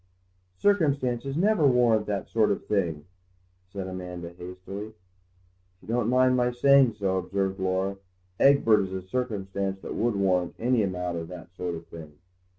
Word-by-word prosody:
"Circumstances 140 - +1
never 185 -4 +3
warrant 120 -4 +3
that 100 -2 -2
sort 110 -2 +2
of 100 - -2
thing," 85 -8 -1 0.7
said 95 -1 -5
Amanda 90 -2 -6
hastily. 90 +4 -8
"If 90 -1 -27
you - - -17
don't 115 -1 +1
mind 130 0 +4
my 125 -1 +2
saying 130 0 +4
so," 95 -3 -1
observed 95 +1 -2
Laura, 95 +1 -1 0.4
"Egbert 135 -6 +5
is 95 -1 -3
a 95 -1 -4
circumstance 100 -3 -3
that - - -6
would 115 -1 0
warrant 90 -3 +1
any 120 0 +2
amount 90 -3 -2
of 80 - -6
that 90 0 -11
sort 90 -1 -3
of 80 0 -9
thing. 80 -3 -11
95 Hz, 155 wpm, -26 LUFS, 90-120 Hz, 0.7 s, Egbert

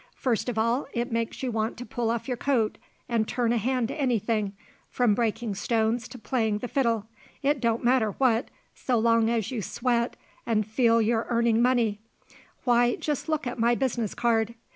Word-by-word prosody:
First 245 -1 -1
of 235 - -4
all 230 +5 +1
it 240 +2 -1
makes 230 +2 -2
you 255 - -1
want 220 0 -2
to 245 - -7
pull 235 -2 -2
off 235 +2 -2
your 250 - -1
coat 235 -4 0 0.3
and 230 -3 0
turn 240 -1 0
a 235 - +1
hand 250 +1 0
to 280 - -4
anything, 220 -5 0 0.4
from 245 -4 +2
breakin' 225 0 -1
stones 225 +3 0
to 250 +1 -10
playing 220 -2 0
the 245 - -5
fiddle 230 -5 0 0.4
it 285 0 +2
don't 230 -1 +1
matter 240 -4 +3
what, 245 -3 +1 0.2
so 250 -2 -1
long 230 0 +3
as 230 -2 -1
you 240 -4 -2
sweat 235 +3 -1 0.3
an' 215 -2 +1
feel 230 +1 +3
you're 225 +1 0
earnin' 235 -1 +2
money. 240 -4 +2 0.6
Why, 240 -1 +3
just 295 -3 -3
take - - -22
a - - -2
look 310 -2 0
at 245 0 -4
my 235 +1 +3
business 235 -5 -1
card!" 230 -2 +1
235 Hz, 195 wpm, -27 LUFS, 225-245 Hz, 0.6 s, matter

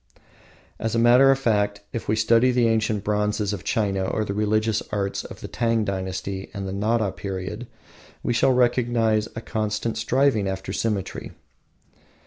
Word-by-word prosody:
As 115 0 -2
a - - +2
matter 120 +3 +6
of 135 - +5
fact, 105 -5 0
if 115 - -4
we 110 - +2
study 115 +3 +4
the 125 -2 +3
ancient 110 -2 0
bronzes 105 0 0
of 95 - -5
China 95 -3 0
or 110 +3 -1
the 100 - -3
religious 110 +1 +1
arts 100 -1 -2
of - - -10
the - - -6
Tang 115 -2 0
dynasty 95 0 -4
and 100 -1 -4
the 95 - -4
Nara 105 0 +1
period, 100 +5 -5 0.6
we 120 - 0
shall 120 +3 +3
recognize 120 -3 +2
a 115 - -4
constant 110 0 -2
striving 120 -2 +2
after 95 0 -4
symmetry. 105 -3 -3
110 Hz, 160 wpm, -24 LUFS, 100-115 Hz, 0.6 s, matter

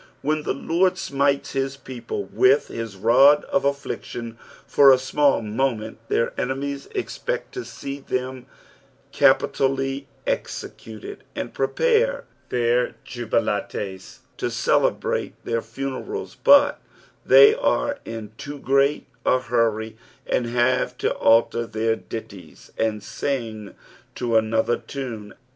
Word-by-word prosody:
When 155 +2 0
the 150 - -1
Lord 180 +6 +1
smites 140 -5 0
his 135 0 -2
people 135 - -6
with 410 +4 +3
his 115 -3 -5
rod 130 +9 +5
of 185 - 0
affliction 120 -4 -4 0.3
for 140 -1 +6
a - - +8
smBll 135 0 +2
moment, 110 0 -2
their 115 - 0
enemies 140 +2 -3
expect - - -3
to 380 - -4
see 140 - -7
them 130 -1 -4 0.7
capi - - +5
tally 135 0 -1 0.2
executed, 415 -4 -5
and - - -4
prepare 485 +1 +1 0.3
their 120 0 +1
jvbilatei 105 -5 -3 0.2
to - - -2
celebrate - - 0
their 115 0 -1
funerals, 135 - -5
but 285 0 +5 0.4
they 435 -3 +8
■re 290 -12 0
in 110 -2 -7
too 145 0 -6
great 140 +1 +2 0.2
a 130 - +3
hurry, 110 -3 0 0.3
and 120 - 0
have 120 +2 +1
to - - 0
alter 115 +1 +3
their 110 0 0
ditties 100 -5 -10
and 110 -2 -1
sing 110 -6 -4 0.4
to 120 -2 -1
another 110 +1 +2
tunc. 115 -7 -7
130 Hz, 120 wpm, -23 LUFS, 115-145 Hz, 0.7 s, a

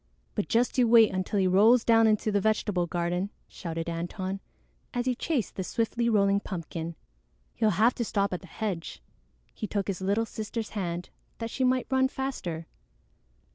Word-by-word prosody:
"But - - -2
just 240 +2 +2
you 245 - +5
wait 225 -1 +7
until 185 +2 -1
he 190 - +3
rolls 215 +6 +5
down 225 -1 +6
into 215 0 +2
the 200 -1 +2
vegetable 205 -4 +1
garden," 175 +3 -1 0.2
shouted 165 -2 -5
Antone, 185 +3 -3 0.6
as 245 0 0
he 255 - +2
chased 260 -1 -1
the 190 - -1
swiftly 230 +4 0
rolling 200 -2 +3
pumpkin. 170 -3 -5 0.6
"He'll 220 - +2
have 230 +4 +5
to 235 - -2
stop 200 -3 0
at 180 - -3
the 185 - -13
hedge." 185 -3 -4 0.5
He 215 - -4
took 200 -1 -2
his 195 -2 -3
little 200 +4 +1
sister's 220 +1 -5
hand 175 -4 -3 0.3
that 230 0 -4
she 260 - -1
might 255 0 +2
run 260 0 +4
faster. 255 -12 -4
205 Hz, 175 wpm, -28 LUFS, 180-230 Hz, 0.6 s, wait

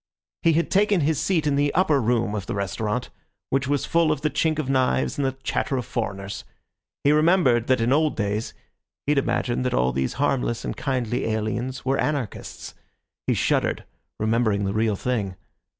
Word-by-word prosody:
He 165 -2 +4
had 170 +2 0
taken 200 -2 +3
his 150 0 +1
seat 160 -2 +1
in 145 -2 +2
the 145 0 +2
upper 155 -6 +3
room 115 -2 +1
of 100 -3 -4
the - - -3
restaurant, 105 +5 -2 0.4
which 135 0 +1
was 145 0 0
full 165 -2 +3
of 150 -2 -1
the 150 - 0
chink 160 -2 +1
of 155 -4 -2
knives 130 +2 +1
and - - +1
the 135 0 -2
chatter 135 - -1
of 125 - -3
foreigners. 100 -3 -4 0.6
He 145 - +5
remembered 150 -7 +4
that 130 -1 +3
in 120 +3 +3
old 155 +1 +2
days 105 0 -2 0.5
he 145 - +1
had 145 - +4
imagined 120 -1 0
that 125 - 0
all 60 +1 +2
these 65 +1 -1
harmless 125 -4 0
and - - -3
kindly 125 -4 -1
aliens 110 +4 -2
were 135 +1 +1
anarchists. 140 -9 -3 0.5
He - - +2
shuddered, - - +1 0.4
remembering 110 -2 +1
the 95 - -1
real 110 -1 +1
thing. 105 -4 -2
130 Hz, 185 wpm, -24 LUFS, 110-150 Hz, 0.6 s, He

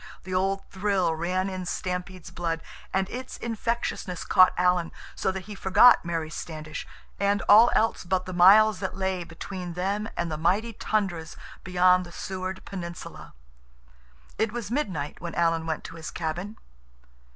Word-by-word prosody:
The 185 - -6
old 195 +1 0
thrill 190 -3 +1
ran 180 +4 -1
in 185 -1 -4
Stampede's 180 0 -4
blood, 165 -1 -3 0.3
and 190 0 0
its 255 +1 -6
infectiousness 230 -5 -3
caught 185 - +6
Alan, 180 -1 +2 0.2
so - - -1
that 190 0 -5
he 210 +3 -9
forgot 205 +5 +6
Mary 165 -2 -3
Standish, 155 -1 -6 0.3
and 200 0 +1
all 225 +4 +8
else 225 - +1
but 185 0 -1
the 185 - -6
miles 200 +3 +6
that 190 -1 -4
lay 190 -2 -1
between 175 +2 -7
them 200 +5 -2
and 170 -1 -1
the 155 - -3
mighty 205 +8 +1
tundras 190 -7 -2 0.3
beyond 180 0 +4
the 175 - -11
Seward 185 +1 -5
Peninsula. 175 - -8 1.0
It 220 -1 +1
was 230 -3 -5
midnight 185 - -2
when 170 0 -5
Alan 165 -1 +1
went 160 -1 -2
to 165 - -9
his 160 - -6
cabin. 175 +6 -4
185 Hz, 155 wpm, -26 LUFS, 170-200 Hz, 1.0 s, all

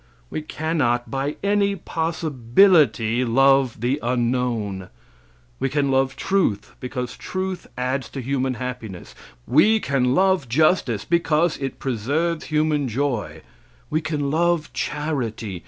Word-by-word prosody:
We - - -3
cannot 150 -6 -1
by 140 +2 -2
any 200 0 +2
possibility 150 - +2
love 135 -1 +3
the 130 +4 0
unknown. 120 -5 -1 0.7
We 135 - 0
can 140 0 0
love 135 0 +1
truth, 135 - 0
because 125 -1 -5
truth 185 -1 -4
adds 125 -1 -2
to 135 - -6
human 130 0 -1
happiness. 120 -7 -7 0.3
We 210 - +4
can 135 -6 +1
love 185 -8 +2
justice, 135 - +2
because 170 -1 +2
it 135 -1 -4
preserves 145 +7 -1
human 150 -2 +1
joy. 125 -3 -2 0.5
We 155 - +1
can 150 -3 -2
love 170 0 +1
charity. 120 - -3
135 Hz, 120 wpm, -22 LUFS, 120-160 Hz, 0.7 s, We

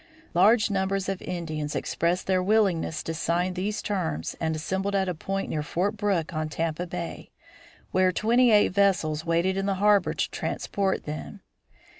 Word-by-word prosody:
Large 210 +4 +4
numbers 195 0 0
of 195 -1 -3
Indians 155 -4 -4
expressed 170 +2 -1
their 185 -1 +2
willingness 185 -6 +1
to 165 - -3
sign 175 +3 0
these 205 +4 -3
terms 80 - -2
and 160 -1 0
assembled 190 +5 -2
at 190 -1 +1
a 180 - 0
point 195 +4 -3
near 155 - -1
Fort 180 +7 -1
Brooke 195 -5 -1
on 155 0 -2
Tampa 165 +3 -2
Bay, 170 -1 -6 0.6
where 185 0 +3
twenty 235 +6 +3
eight 210 -2 +5
vessels 180 -6 +1
waited 170 +3 +1
in 195 0 -1
the 195 - +1
harbor 205 +1 +3
to - - -1
transport 195 -2 -2
them. 155 +6 -7
185 Hz, 165 wpm, -26 LUFS, 165-200 Hz, 0.6 s, eight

